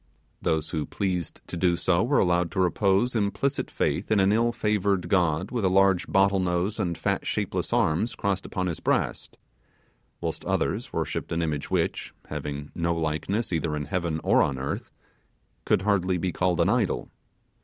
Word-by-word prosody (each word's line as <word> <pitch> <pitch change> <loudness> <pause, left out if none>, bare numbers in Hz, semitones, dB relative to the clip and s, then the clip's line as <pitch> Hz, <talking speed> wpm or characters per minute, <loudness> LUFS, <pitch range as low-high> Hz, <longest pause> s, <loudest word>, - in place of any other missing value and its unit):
Those 80 -1 0
who 80 -2 -2
pleased 90 -5 -3
to - - -7
do 85 0 +2
so 90 +1 +2
were 145 +4 +2
allowed 90 -1 +2
to 95 - -2
repose 100 +6 +2
implicit 110 +6 0
faith - - -1
in 110 -2 +3
an 95 +1 +4
ill 115 +2 +3
favoured 100 -5 0
god 85 -1 +1
with 120 -4 -1
a 95 - +4
large 95 -1 +3
bottle 95 0 +3
nose 90 +4 0
and 85 -5 -1
fat - - -1
shapeless - - -2
arms 95 +9 +1
crossed 100 -1 -1
upon 95 - -3
his 85 -3 -2
breast; - - -1 0.8
whilst - - -4
others - - -1
worshipped - - -3
an 85 0 0
image 75 -3 -2
which, - - -1
having 70 0 -5
no 85 0 0
likeness 85 +7 -1
either 80 -2 0
in 75 -1 -3
heaven 85 +1 -2
or - - +4
on 65 - +1
earth, 70 +2 -4 0.8
could 95 - +2
hardly 95 -3 +2
be 90 +1 -1
called 90 -1 0
an 85 - +3
idol. - - 0
90 Hz, 175 wpm, -26 LUFS, 85-100 Hz, 0.8 s, an